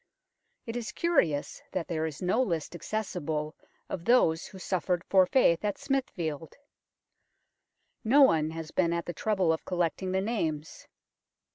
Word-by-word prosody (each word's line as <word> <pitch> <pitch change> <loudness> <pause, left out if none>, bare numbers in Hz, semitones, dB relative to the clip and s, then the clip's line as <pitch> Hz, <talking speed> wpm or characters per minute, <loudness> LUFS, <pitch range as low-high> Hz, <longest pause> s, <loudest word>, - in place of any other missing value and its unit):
It 230 - -5
is 240 -2 -4
curious 170 - 0
that 180 -3 -2
there 160 -2 -1
is 155 +2 -7
no 190 +8 +2
list 170 - -2
accessible 160 -4 -3 0.3
of 170 - -5
those 190 -9 +3
who 195 - -12
suffered 180 -1 -1
for 190 -2 +4
faith 185 -8 +3
at 205 -1 -1
Smithfield 165 - -3 1.5
no 270 +6 +6
one 160 - +4
has 160 0 -7
been 170 -2 +1
at 170 0 -2
the 175 - -4
trouble 190 -6 +1
of 160 - -4
collecting 180 +1 -1
the 190 - +1
names. 165 -9 -3
175 Hz, 145 wpm, -29 LUFS, 160-215 Hz, 1.5 s, no